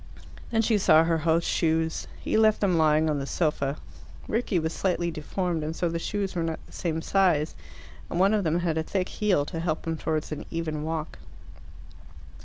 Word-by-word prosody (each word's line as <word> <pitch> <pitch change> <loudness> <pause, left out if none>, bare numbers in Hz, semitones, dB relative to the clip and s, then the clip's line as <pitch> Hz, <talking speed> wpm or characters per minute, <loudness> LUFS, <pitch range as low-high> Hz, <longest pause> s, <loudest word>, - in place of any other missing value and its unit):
Then 225 -1 +2
she 220 -1 +2
saw 160 -4 +6
her 165 0 +1
host's 165 +1 +1
shoes: 160 -1 0
he - - -6
had - - +4
left 215 -1 +4
them 190 -4 +2
lying 155 -1 +3
on 150 -2 0
the 135 - -4
sofa. 150 -3 0 0.5
Rickie 225 -3 0
was 160 0 -1
slightly 175 -2 0
deformed, 165 +1 -2
and 155 +1 -3
so 175 - 0
the 165 0 -2
shoes 200 +2 -2
were 170 - 0
not 165 -1 -2
the - - -18
same 160 -2 -3
size, 175 -6 +2 0.6
and 170 - -2
one 195 +3 +4
of 210 -2 +2
them 165 +1 +1
had 165 -2 0
a - - -1
thick 185 +2 -2
heel 190 -9 +1
to 165 +2 -5
help 160 -2 -2
him 165 -1 -2
towards 155 -1 -2
an 150 - -4
even 160 -2 -3
walk. 155 0 -4
165 Hz, 205 wpm, -27 LUFS, 155-185 Hz, 0.6 s, saw